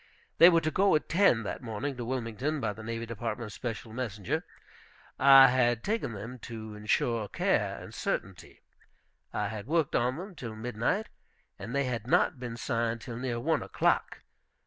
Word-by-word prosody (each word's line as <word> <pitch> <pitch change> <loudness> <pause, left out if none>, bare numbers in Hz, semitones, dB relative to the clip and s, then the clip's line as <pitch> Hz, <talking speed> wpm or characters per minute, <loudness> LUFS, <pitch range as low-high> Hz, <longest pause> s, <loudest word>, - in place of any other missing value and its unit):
They 170 - +10
were 165 -2 +4
to 155 -1 -1
go 195 +3 +3
at 155 - 0
ten 160 - +4
that 100 - -5
morning 125 +4 -4
to 120 - -4
Wilmington, 130 +4 -2
by 105 - -1
the 110 - -10
Navy 115 +1 -4
Department's 115 -1 -5
special 115 -2 -6
messenger. 110 -6 -3 0.8
I 135 -1 +9
had 120 -2 +2
taken 215 - -1
them 115 +5 -7
to 110 -2 -8
insure 105 +1 0
care - - 0
and - - -10
certainty. 95 -1 -4 0.7
I 105 -1 -2
had 110 0 -6
worked 160 -1 +1
on 125 +3 +1
them 190 +3 -7
till 115 -9 -7
midnight, 120 - -1 0.5
and 120 - -6
they 140 - +2
had 120 -3 -3
not 130 - +2
been 120 -2 -6
signed 115 -2 -1
till 115 0 -7
near 125 -1 -2
one 155 +5 +1
o'clock. - - 0
120 Hz, 170 wpm, -29 LUFS, 110-135 Hz, 0.8 s, They